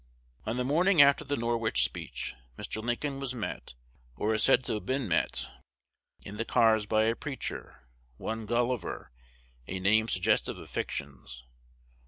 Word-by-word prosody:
On 115 +3 -1
the 125 - 0
morning 170 +7 +3
after 140 -1 +7
the 145 +1 -1
Norwich 115 -1 +1
speech, - - -3 0.2
Mr. 110 - -5
Lincoln 135 +4 -2
was 135 -2 -4
met, 105 - -5 0.4
or 110 - 0
is 110 - +2
said 135 - +5
to - - -1
have 105 - -4
been 130 -2 0
met, 85 - 0 0.7
in 105 +1 -8
the 115 - 0
cars 110 -2 +3
by 110 +1 +3
a 115 +1 +2
preacher, 140 0 -6 0.3
one 110 -1 -4
Gulliver, 120 - -1 0.6
a 95 - -3
name 110 +4 +4
suggestive 90 -5 +1
of - - -11
fictions. 60 -3 -5
115 Hz, 155 wpm, -30 LUFS, 105-130 Hz, 0.7 s, after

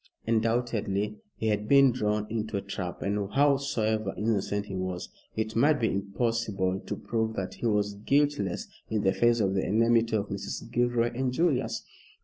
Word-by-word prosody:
Undoubtedly 110 -3 0 0.2
he 110 - -1
had 105 0 0
been 140 0 +6
drawn 105 -3 0
into 110 -1 -2
a - - -2
trap, 95 -3 -5
and 100 0 -1
howsoever 125 -7 +1
innocent 105 -1 0
he 100 - -8
was, 90 -1 -3 0.3
it 110 0 -2
might 145 +5 +4
be 115 - +1
impossible 100 -1 -1
to - - -2
prove 110 -1 -2
that 95 -3 -3
he 120 - -2
was 105 -1 +1
guiltless 110 -2 0 0.2
in 110 -2 0
the 95 -1 +3
face 120 +2 +3
of 95 -3 +2
the 95 - +1
enmity 115 +1 +3
of 100 -1 -1
Mrs. 100 +3 -5
Gilroy 120 -1 +2
and 130 +1 -1
Julius. 145 -1 0
110 Hz, 165 wpm, -28 LUFS, 100-120 Hz, 0.3 s, been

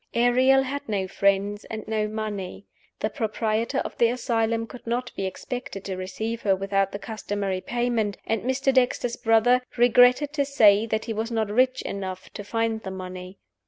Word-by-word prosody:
Ariel 255 +3 +4
had 280 +1 -5
no 195 -3 -1
friends 200 +2 +1
and 220 -1 -7
no 215 -1 0
money. 210 -3 -5 0.4
The 215 - -1
proprietor 220 +3 -1
of - - -6
the 235 - +6
asylum 230 -2 0
could 240 0 -12
not 245 +1 -2
be 195 - -2
expected 245 +1 -6
to 190 - -3
receive 220 +5 -4
her 195 -2 +3
without 195 0 0
the 200 - -4
customary 200 -2 -3
payment; 235 -4 -1
and 225 -2 0
Mr. 265 +2 +1
Dexter's 245 -2 +1
brother 225 +3 +3 0.2
"regretted 245 +4 +5
to 290 -2 +1
say 225 -6 +4
that 220 0 -1
he 225 - -3
was 220 +2 -2
not 220 -3 -1
rich 255 +3 +2
enough 190 -2 -5
to 205 - -6
find 225 +1 -1
the 190 - -6
money." 185 0 -8
220 Hz, 175 wpm, -25 LUFS, 200-245 Hz, 0.4 s, the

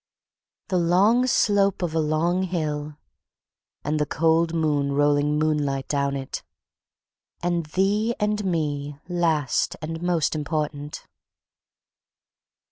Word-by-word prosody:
"The 185 - +2
long 200 +9 +3
slope 200 -5 +2
of 170 -3 -2
a 165 - +1
long 160 +4 +1
hill." 150 -5 -3 0.9
"And 150 +2 -1
the 150 - 0
cold 165 +1 +2
moon 150 -4 0
rolling 145 +1 +2
moonlight 150 -3 0
down 140 -1 0
it." 135 -1 -5 1.0
"And 175 -2 0
thee 205 +7 +1
and 210 0 0
me, 145 -5 -2
last 165 -6 0
and 160 +1 -5
most 175 -4 +1
important." 150 -1 -3
160 Hz, 110 wpm, -24 LUFS, 145-175 Hz, 1.0 s, long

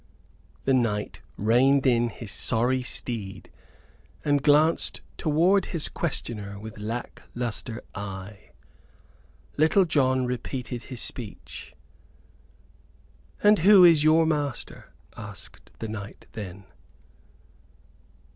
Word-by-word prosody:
The 135 - +2
knight 115 -5 0 0.2
reined 130 +6 +3
in 120 -2 +3
his 115 -2 -7
sorry 125 +3 +1
steed, 115 -5 -5 0.7
and 145 -1 +2
glanced 150 +3 +3
toward 175 +6 +2
his 165 -4 0
questioner 105 -10 -4
with 110 0 -9
lack 115 +3 -5
lustre 120 -1 -4
eye. 100 0 -8 1.1
Little 160 +5 +4
John 130 -5 +2
repeated 125 0 -4
his 125 -3 -5
speech. 120 -7 -7 1.7
"And 210 0 +6
who 190 +2 +7
is 165 -4 +6
your 160 +1 +5
master?" 145 -5 -3 0.2
asked - - -11
the 115 - -5
knight 105 -1 -8
then. 95 -2 -8
125 Hz, 100 wpm, -26 LUFS, 110-150 Hz, 1.7 s, who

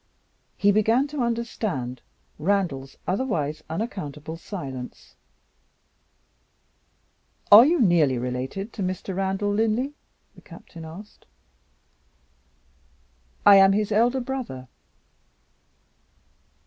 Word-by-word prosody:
He 205 - +4
began 225 +6 +2
to 290 -2 -3
understand 220 - -3 0.4
Randal's 155 -7 -1
otherwise 175 - -1
unaccountable 160 - -5
silence. 140 -9 -8 2.4
"Are 220 +6 +10
you 340 +2 +2
nearly 170 - +3
related 130 - -4
to 210 - -6
Mr. 185 0 -3
Randal 195 +2 -1
Linley?" 225 +6 0 0.4
the - - -17
Captain 165 -2 -12
asked. 185 +7 -12 2.2
"I 200 -1 +9
am 195 0 +6
his 210 +1 0
elder 240 +5 +2
brother." 240 - -6
195 Hz, 85 wpm, -24 LUFS, 155-225 Hz, 2.4 s, Are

